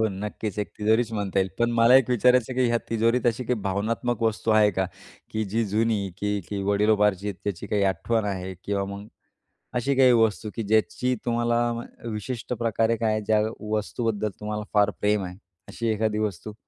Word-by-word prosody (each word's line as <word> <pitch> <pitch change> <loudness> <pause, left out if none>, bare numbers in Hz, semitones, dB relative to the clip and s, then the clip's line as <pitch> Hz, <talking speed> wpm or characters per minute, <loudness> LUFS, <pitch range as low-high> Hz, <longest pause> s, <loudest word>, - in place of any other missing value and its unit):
हो, - - +2
नक्कीच. 105 +1 -5
एक 105 - -2
तिजोरीच 110 +2 +2
म्हणता 100 -3 -1
येईल. 95 0 +2
पण 120 0 +2
मला 115 +1 +5
एक 130 -2 +3
विचारायचं 125 +1 +3
की 130 0 +2
ह्या 120 0 +2
तिजोरीत 115 +2 +2
अशी 120 +2 +1
काही 125 - +1
भावनात्मक 110 +4 -1
वस्तू 110 0 0
आहे 110 -1 +5
का? 95 0 -1 0.4
की 110 0 -1
जी 110 +3 -1
जुनी, 105 -1 0
की 105 0 -1
ती 100 -1 -2
वडीलोपार्जित 105 -1 +2
त्याची 100 -5 -3
काही 105 -1 0
आठवण 115 +1 -1
आहे 95 -2 -3
किंवा 100 -1 -1
मग 100 +1 -7 0.7
अशी 135 +3 +1
काही 130 -1 +6
वस्तू 110 -2 +2
की 115 - -2
ज्याची 110 +4 +1
तुम्हाला 120 0 +1
म 115 - -4 0.3
विशिष्ट 115 +3 -4
प्रकारे 115 0 +1
काय 110 -2 0
ज्या 105 +1 +2 0.3
वस्तूबद्दल 110 0 -1
तुम्हाला 105 0 -4
फार 105 -1 +4
प्रेम 105 -1 +1
आहे 90 0 -6 0.3
अशी 115 - -4
एखादी 110 0 0
वस्तू? 105 0 -3
110 Hz, 180 wpm, -25 LUFS, 105-115 Hz, 0.7 s, काही